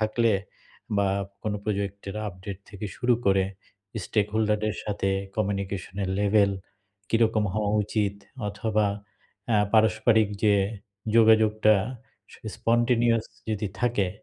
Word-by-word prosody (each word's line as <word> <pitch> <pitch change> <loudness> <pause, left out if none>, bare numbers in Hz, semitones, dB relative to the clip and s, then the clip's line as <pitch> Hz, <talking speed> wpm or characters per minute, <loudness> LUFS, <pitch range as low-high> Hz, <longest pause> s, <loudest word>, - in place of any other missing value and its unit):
থাকলে 110 +1 +2 0.6
বা 100 -1 +2 0.3
কোনো 105 -1 -1
প্রজেক্টের 100 -1 -3
আপডেট 95 +1 -8
থেকে 105 0 -6
শুরু 125 -1 +3
করে 95 -1 +4 0.6
স্টেক 105 -2 +1
হোল্ডার 105 -1 +2
দের 110 - -1
সাথে 100 -2 -1 0.3
কমিউনিকেশনের 100 -2 -2
লেভেল 100 0 +4 0.6
কীরকম 115 -2 +2
হওয়া 105 -1 0
উচিত? 105 -1 -1 0.3
অথবা 110 0 0 0.7
আ - - +5 0.2
পারস্পারিক 110 0 +4 0.2
যে 105 -1 +5 0.6
যোগাযোগটা 110 -1 +5 0.6
স - - -12 0.2
স্পন্টেনিয়াস 120 -1 +2 0.3
যদি 105 -1 -1
থাকে 120 -6 +1
105 Hz, 110 wpm, -26 LUFS, 100-110 Hz, 0.7 s, আ